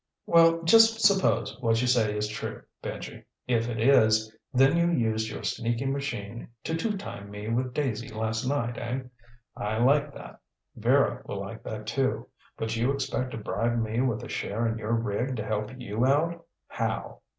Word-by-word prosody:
"Well, 165 0 +5
just 225 +5 +6
suppose 200 -2 +3
what 115 -1 +2
you 125 - +1
say 110 -4 +2
is 105 0 0
true, 110 - -6 0.2
Benji. - - -7 0.2
If 120 -1 +1
it 115 -2 -3
is, 110 -3 +4 0.2
then 135 +4 +4
you 170 0 +3
used 110 -8 0
your 110 - -7
sneaky 120 +3 -1
machine 120 -6 -3 0.2
to 160 - -2
two 210 +5 -1
time 100 - -8
me 105 +1 -6
with 125 +2 -1
Daisy 120 -6 -1
last 110 +1 -2
night, 120 -4 -1
eh? 125 +3 -3 0.5
I 105 +1 -2
like 140 +5 +3
that. - - -11 0.4
Vera - - +2
will - - -4
like - - -7
that, 110 -1 -5
too. 115 -1 -1 0.3
But 110 0 -2
you 120 +4 +1
expect 135 -2 -2
to - - -4
bribe 115 +3 -1
me 110 +1 0
with 120 -3 0
a - - -6
share 115 +3 -2
in 115 0 -1
your 110 +1 -2
rig 115 +3 -1
to 110 - -4
help 105 0 -2
you 115 -1 -2
out. 165 +5 +1 0.2
How? - - -3
120 Hz, 180 wpm, -27 LUFS, 110-140 Hz, 0.5 s, just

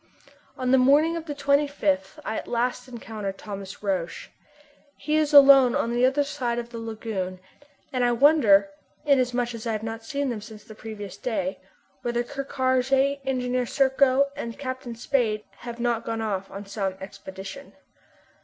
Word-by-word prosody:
On 255 -1 0
the 265 - +6
morning 290 +6 +4
of 330 -1 -6
the 290 - -4
25th 280 -10 +1
I 220 - -2
at - - -5
last 245 +1 -1
encounter 220 -4 -5
Thomas 195 0 -8
Roch. 185 -4 -2 0.7
He 305 +2 -1
is 310 -1 +2
alone 275 -3 +8
on 235 - 0
the 245 +1 +4
other 280 +2 +2
side 255 -4 -2
of 235 0 -4
the 230 - -6
lagoon, 215 -5 -4 0.5
and 250 -1 +1
I 240 - +3
wonder, 235 -7 +5 0.4
inasmuch 245 -4 +2
as 230 0 -6
I 225 - 0
have 215 0 -3
not 225 0 -5
seen 280 +3 -2
them 220 -3 -4
since 215 -1 -11
the 220 - -12
previous 205 -3 -8
day, 270 +3 -2 0.4
whether 240 0 -1
Ker 275 +3 -5
Karraje, 265 +1 +1
Engineer 250 -1 -1
Serko, 270 +1 +3
and 235 -5 -6
Captain 255 -3 -5
Spade 230 -3 0
have 235 0 -8
not 235 -1 0
gone 225 -1 -3
off 195 -3 -3
on 200 +1 -8
some 195 -2 -3
expedition. 195 +5 -9
240 Hz, 165 wpm, -25 LUFS, 215-270 Hz, 0.7 s, alone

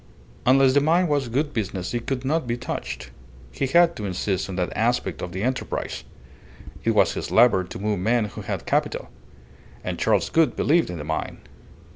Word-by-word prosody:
Unless 130 0 +5
the 145 - +4
mine 170 +5 +3
was 145 -4 0
good 145 +5 -1
business 95 -4 -3
it 120 -1 -3
could 135 -1 -2
not 155 -1 0
be 120 0 -1
touched. 125 - -5 0.4
He 135 - -2
had 170 +4 +4
to 105 - -4
insist 95 0 -2
on 95 - -4
that 90 -1 -2
aspect 110 - 0
of 90 - -5
the 95 +3 -4
enterprise. 130 +1 -3 0.8
It - - +1
was - - +4
his - - -4
lever 115 -5 +5
to 90 - -8
move 105 -1 -1
men 115 +4 +2
who 100 - -7
had - - -4
capital. - - -1 0.7
And - - -4
Charles - - +2
Gould 160 -5 +3
believed 165 +3 +2
in 90 - -5
the 75 - -5
mine. 80 +1 -4
120 Hz, 190 wpm, -24 LUFS, 95-140 Hz, 0.8 s, Unless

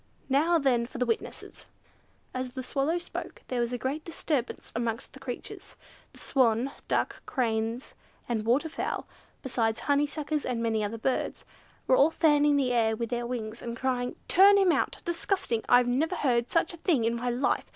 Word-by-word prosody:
Now 315 +6 +4
then 250 -6 +2
for - - -9
the 250 - +1
witnesses." 230 -1 -4 0.7
As 255 -1 -4
the 260 -1 -5
Swallow 280 +6 0
spoke, 345 - -7
there 250 -2 0
was 235 0 -1
a 245 - -1
great 270 +6 -3
disturbance 300 -6 -3
amongst 230 -1 -3
the 270 - -12
creatures. 255 -3 -7 0.4
The - - -16
swan, 250 0 +2 0.2
ducks, - - 0
cranes, 230 -1 -1 0.3
and 230 -3 -1
water 250 +8 +2
fowl, 320 - -3 0.4
besides 230 -4 0
honeysuckers, 295 +1 0
and 250 -2 -2
many 220 -2 +1
other 210 +2 -3
birds, 255 +3 -2 0.4
were 255 - +4
all 285 - +6
fanning 295 -3 +3
the 260 -3 +1
air 220 -2 +2
with 230 +1 -4
their 240 0 -1
wings, 230 -2 -4
and 235 0 -5
crying, 250 -1 -1
"Turn 400 +3 +7
him 385 -3 +5
out!" - - 0
"Disgusting!" 340 - -1
"I 245 0 +7
never 280 +9 0
heard 245 -7 +1
of - - -22
such 330 +1 +1
a - - -9
thing 315 - +1
in 230 - +1
my 245 +1 -2
life! 245 +3 0
255 Hz, 180 wpm, -28 LUFS, 235-295 Hz, 0.7 s, Turn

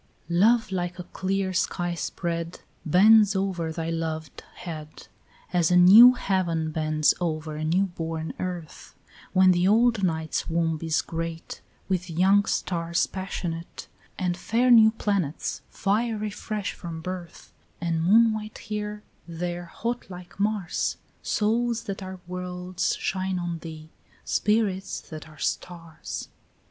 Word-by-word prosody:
13 170 0 +1
Love 225 +1 +4
like 180 -1 -2
a 180 - -6
clear 190 +1 -2
sky 175 -1 -1
spread 170 0 -4 0.2
Bends 205 +5 +6
over 185 -4 -1
thy 165 0 -3
loved 160 -2 -4
head, 155 -3 -8 0.5
As 175 -2 +3
a 180 - +4
new 215 +8 +10
heaven 170 -8 -1
bends 155 -1 +2
over 155 -2 -2
a 155 - -4
new 170 +5 +2
born 165 -3 -5
earth, 175 -4 -6 0.4
When 185 0 +6
the 180 +1 +2
old 225 0 +3
night's 160 -3 -1
womb 165 -1 0
is 160 -1 0
great 165 0 -5 0.3
With 185 -2 -1
young 190 +5 +4
stars 170 -4 0
passionate 175 -3 -5 0.3
And 180 -1 -1
fair 235 +7 +1
new 220 -2 +8
planets 200 -8 -2
fiery 215 +1 -1
fresh 210 0 -4
from 165 -2 -7
birth; 180 -1 -7 0.3
And 165 -1 -1
moon 220 +5 +5
white 215 0 -6
here, 210 -1 -5 0.2
there 175 +1 -4
hot 235 +7 -4
like 180 0 -11
Mars, 205 -3 -1 0.2
Souls 230 +2 0
that 195 0 -5
are 185 0 -7
worlds 180 0 -3
shine 190 0 -2
on 175 -1 -3
thee, 160 -1 -10 0.3
spirits 200 -3 0
that 155 0 -8
are 155 - -16
stars. 165 -2 -5
180 Hz, 135 wpm, -26 LUFS, 165-200 Hz, 0.5 s, new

